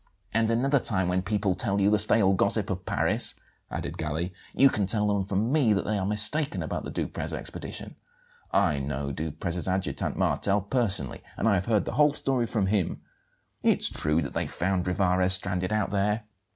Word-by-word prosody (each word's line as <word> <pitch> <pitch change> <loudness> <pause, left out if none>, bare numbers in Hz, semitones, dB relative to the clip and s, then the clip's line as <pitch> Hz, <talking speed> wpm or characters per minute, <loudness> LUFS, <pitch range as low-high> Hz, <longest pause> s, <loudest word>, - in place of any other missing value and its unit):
"And 115 0 +2
another 135 +5 +2
time 95 -6 +2
when 90 +1 +1
people 100 -1 0
tell 100 -1 -1
you 100 +1 +3
the 105 - +3
stale 100 -2 +4
gossip 95 - 0
of - - -5
Paris," - - +1 0.3
added - - -5
Galli, 80 +3 -3 0.2
"you 135 - +7
can 105 -7 0
tell 105 0 +1
them 100 -1 +1
from 100 +5 -1
me 135 -8 +3
that 100 - -1
they 105 -1 0
are 95 - -2
mistaken 110 +9 +1
about - - -4
the - - -6
Duprez - - -4
expedition. - - -6 0.6
I 75 -4 +2
know 70 0 -3
Duprez's 80 +4 -3
adjutant, 95 0 -2
Martel, 100 +1 +1
personally, 100 - +1 0.2
and - - 0
have 95 -2 +2
heard 110 -3 +2
the - - -3
whole 150 -1 +5
story 130 -5 0
from 110 -4 0
him. 95 -3 -1 0.6
It's - - +3
true 75 +2 0
that - - -5
they - - -1
found 90 0 -1
Rivarez 90 0 +2
stranded 90 0 -2
out 110 -2 0
there. 105 +2 0
100 Hz, 185 wpm, -27 LUFS, 90-110 Hz, 0.6 s, you